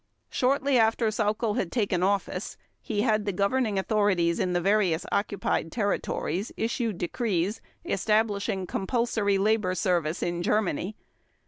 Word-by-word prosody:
Shortly 270 0 +2
after 225 0 +3
Sauckel 215 0 0
had 175 - -1
taken 200 -7 0
office, 195 0 -1 0.2
he 210 -3 -1
had 215 -3 +1
the 205 - 0
governing 205 +3 0
authorities 190 -4 +1
in 180 - 0
the 175 - +2
various 190 -3 +2
occupied 200 -5 -1
territories 200 -3 -2
issue 230 0 -1
decrees, 190 +1 -1 0.2
establishing 205 -1 0
compulsory 205 0 0
labor 205 -2 +1
service 170 -3 0
in 175 0 -2
Germany. 205 0 0
205 Hz, 125 wpm, -27 LUFS, 185-220 Hz, 0.2 s, after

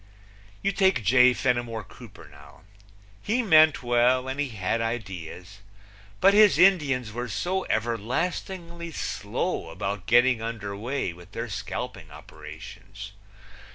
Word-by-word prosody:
You 200 - +2
take 190 - +2
J. 125 +2 +6
Fenimore 120 -3 -1
Cooper - - -14
now. 70 +2 -17 0.6
He 240 +4 0
meant 155 - +5
well 125 +2 +2
and 135 +2 -4
he 145 -2 -1
had 110 +1 -2
ideas, 95 -4 -6 0.6
but 195 +1 +5
his 210 -1 +6
Indians 145 - +3
were 120 +2 -4
so 180 - -2
everlastingly 170 - -3
slow - - -3
about 100 0 -5
getting 120 0 +4
under 110 -3 -5
way 115 -3 -3
with 90 +3 -16
their 115 +1 -4
scalping 100 -2 -6
operations! 100 +6 -11
120 Hz, 120 wpm, -26 LUFS, 100-150 Hz, 0.6 s, J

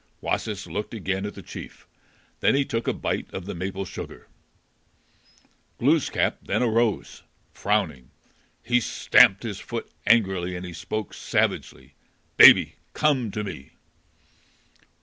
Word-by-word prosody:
Wasis 105 -3 -3
looked 100 +7 -5
again 95 0 -2
at 105 - -8
the - - -10
chief. - - -10 0.5
Then - - +3
he 140 0 +2
took 115 -2 -3
a - - +3
bite - - -3
of 95 - -6
the 100 - -5
maple 95 +2 -4
sugar. 95 - -9 1.5
Glooskap 145 +4 +1
then - - -1
arose, 115 -2 0 0.3
frowning; 90 -12 -1 0.5
he 125 0 +2
stamped 100 -2 +4
his 105 -4 -5
foot 115 -1 -6 0.2
angrily, 95 -6 +2
and 90 +1 -6
he 90 - -8
spoke 100 +5 -5
savagely. - - -2 0.4
"Baby, - - +8 0.2
come 140 -7 +1
to 105 +1 -4
me." 80 -9 -8
105 Hz, 130 wpm, -25 LUFS, 95-115 Hz, 1.5 s, Baby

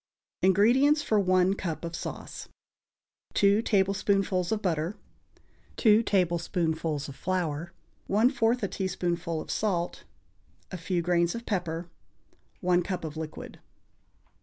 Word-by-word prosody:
INGREDIENTS 245 - +4
FOR 215 -6 +2
ONE 185 -1 +3
CUP 170 -4 -4
OF 170 0 -5
SAUCE. - - -7 0.9
2 200 +2 +4
tablespoonfuls 195 -3 +1
of 220 - +1
butter. 175 0 -1 0.8
2 220 -1 +5
tablespoonfuls 170 -6 0
of 140 - -9
flour. 175 -2 -2 0.4
1/4 230 +2 +2
a - - +2
teaspoonful 175 -3 -2
of - - -6
salt. 180 -5 -1 0.7
A 185 - -4
few 175 0 -1
grains 170 +1 +2
of 235 0 -6
pepper. 175 -4 -2 0.7
1 180 -1 +3
cup 185 0 -4
of 155 -1 -6
liquid. 155 -1 -7
185 Hz, 115 wpm, -28 LUFS, 170-205 Hz, 0.9 s, 2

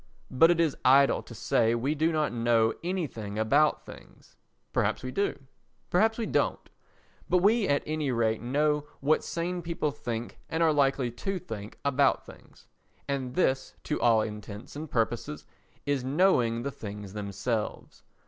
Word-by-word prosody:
But 165 +6 +6
it 175 -1 +3
is 160 -4 +2
idle 135 +2 +5
to 115 - -12
say 115 +2 +2
we 130 +6 0
do 160 +2 +1
not 155 -5 0
know 115 -1 +2
anything 145 - -3
about 140 +8 +2
things—perhaps - - -5
we 130 - -4
do, 200 +8 -1 0.5
perhaps 220 +5 +3
we 230 - -1
don't—but 180 - -3
we 205 +3 +3
at 145 - +1
any 155 -2 -2
rate 110 -2 +1
know 150 +4 +1
what 150 +3 +2
sane 175 +1 -3
people 165 -3 -2
think 120 -4 -5
and 160 +1 +1
are 160 -1 +4
likely 135 -3 +2
to 190 +11 -3
think 110 - -8
about 140 0 +2
things, - - -16 0.4
and 130 -2 -3
this 135 -7 +1
to 150 - -2
all 115 -2 +5
intents 105 +1 -8
and 155 +1 -6
purposes 115 - -2 0.4
is 140 -3 0
knowing 130 -6 +2
the 140 - -2
things 105 -4 -8
themselves. 105 +2 -4
135 Hz, 150 wpm, -28 LUFS, 115-155 Hz, 0.5 s, But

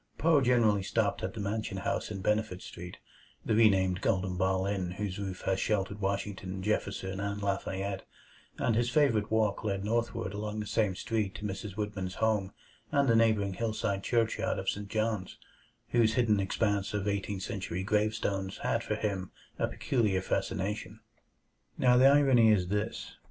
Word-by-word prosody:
Poe 160 -2 +4
generally 120 -5 +3
stopped - - 0
at - - -4
the - - -5
Mansion 100 -1 -2
House 95 - -2
in 100 -3 -5
Benefit 105 -2 0
Street 90 +1 -9 0.5
the - - +1
renamed 95 -4 +4
Golden 95 -3 0
Ball 95 +1 +1
Inn 95 -3 -1
whose 100 -1 -4
roof 95 -2 -5
has 95 0 0
sheltered 100 -1 -1
Washington, 95 -1 -3
Jefferson, 95 -2 -2
and 100 0 -2
Lafayette 95 -1 -2 0.5
and 115 - +1
his 120 +1 +2
favorite 125 -7 +2
walk 110 -2 +1
led 100 -2 -2
northward 110 -4 -1
along 105 +1 -4
the 105 - -3
same 105 -4 +1
street 105 -1 -2
to - - -8
Mrs. 100 0 -4
Whitman's 105 -3 -4
home 105 -4 +1 0.4
and 140 -1 +3
the 115 - +4
neighboring 110 -4 +3
hillside 105 -1 -1
churchyard 115 -1 +1
of 95 - -1
St. 100 0 -6
John's, 110 -3 -2 0.5
whose 115 -2 +3
hidden 110 -4 +3
expanse 100 +1 0
of 105 0 -2
Eighteenth 100 -1 -2
Century 90 -2 -3
gravestones 105 -2 0
had - - 0
for - - -1
him 95 -3 -2 0.3
a - - +2
peculiar 105 -7 0
fascination. 100 +2 -2 0.8
Now 125 -1 +4
the 130 +2 +7
irony 135 -5 +6
is 90 -4 +2
this. 105 +3 -3
105 Hz, 160 wpm, -30 LUFS, 95-110 Hz, 0.8 s, the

